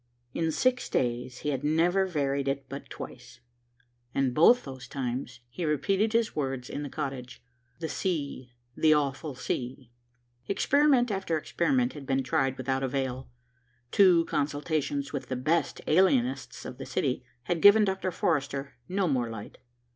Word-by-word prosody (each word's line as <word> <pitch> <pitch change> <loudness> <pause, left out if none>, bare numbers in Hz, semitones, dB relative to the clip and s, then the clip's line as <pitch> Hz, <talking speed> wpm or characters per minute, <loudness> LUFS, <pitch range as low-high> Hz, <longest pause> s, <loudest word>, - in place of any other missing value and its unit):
In 165 -1 0
six 250 +9 +1
days 125 0 -1
he 150 - -1
had 135 -1 -2
never 175 +5 +2
varied 140 -5 -1
it 135 0 -1
but 140 +1 -8
twice, 120 - -9 0.8
and 135 -2 +1
both 235 - +6
those 130 -2 -9
times 125 -2 -4
he 125 +9 -6
repeated 190 +8 +1
his 230 -1 +1
words 135 -4 -3
in 145 - -4
the 145 - -5
cottage, 135 -4 -5 0.4
"The 165 - -3
sea, 145 -9 -3 0.2
the 155 -1 +5
awful 145 0 -1
sea." 125 0 -4 0.6
Experiment 265 +3 +3
after 190 -5 -1
experiment 245 - +1
had 145 -3 -9
been 135 0 +1
tried 135 +1 0
without 130 +1 -1
avail. 130 -1 -2 0.6
Two 180 -4 +6
consultations 145 -1 -1
with 140 - -4
the 130 - -2
best 155 +5 0
alienists 240 - +2
of - - -8
the - - -5
city 130 -2 -1 0.2
had 165 +5 -1
given 210 +1 +8
Dr. 190 -1 -1
Forrester 140 -5 -1
no 190 0 +1
more 125 -6 0
light. 110 -2 -8
145 Hz, 150 wpm, -28 LUFS, 130-180 Hz, 0.8 s, given